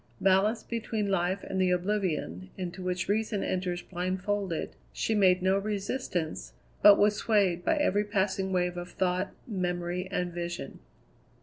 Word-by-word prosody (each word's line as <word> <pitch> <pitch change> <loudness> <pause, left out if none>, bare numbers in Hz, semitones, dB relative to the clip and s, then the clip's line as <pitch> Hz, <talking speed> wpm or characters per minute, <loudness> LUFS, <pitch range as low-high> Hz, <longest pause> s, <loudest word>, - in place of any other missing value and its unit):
Balanced 195 +4 +2
between 220 -3 -2
life 185 +1 0
and 190 - -2
the 185 - +3
oblivion, 175 - -1
into 180 0 -5
which 180 0 -2
reason 215 0 0
enters 180 -1 -2
blindfolded, 185 0 -2 0.2
she 225 - -1
made 185 -3 +4
no 190 +1 +3
resistance, 195 - -3 0.3
but 205 -1 +9
was 210 0 +4
swayed 195 -6 +2
by 325 - +2
every 210 -9 +2
passing 195 -2 0
wave 180 -1 0
of 175 0 -5
thought, 185 +1 0 0.2
memory, 180 -3 -2
and 180 -2 -2
vision. 175 0 -5
185 Hz, 140 wpm, -29 LUFS, 180-205 Hz, 0.3 s, but